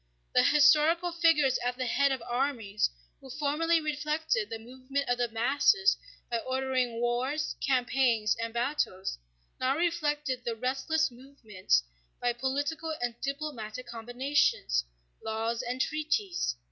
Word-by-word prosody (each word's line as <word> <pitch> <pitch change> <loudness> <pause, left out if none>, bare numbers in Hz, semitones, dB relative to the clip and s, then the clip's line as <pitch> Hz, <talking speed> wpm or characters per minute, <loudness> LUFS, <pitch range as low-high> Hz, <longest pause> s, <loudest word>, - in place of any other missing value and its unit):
The - - +6
historical 305 +4 +5
figures 325 -6 +3
at 245 0 -2
the 255 - -2
head 275 +4 +2
of 260 -3 -2
armies, 240 -5 0 0.3
who 265 - -13
formerly 305 +5 +1
reflected 300 -6 -1
the 225 - -4
movement 260 +4 -4
of 245 0 0
the 245 - +2
masses 285 - +3 0.4
by 235 - +1
ordering 260 -1 -1
wars, 250 +6 -1
campaigns, 250 -4 +2
and 230 0 -3
battles, 235 - -1 0.4
now 265 +2 +1
reflected 295 -6 0
the 235 -1 -2
restless 270 +6 0
movement 235 - -1 0.4
by 245 0 +1
political 285 +6 -2
and 245 -1 -1
diplomatic 270 -5 -4
combinations, 240 - 0 0.4
laws, 225 +2 -2
and 250 +1 -4
treaties. 315 - 0
260 Hz, 125 wpm, -29 LUFS, 240-300 Hz, 0.4 s, The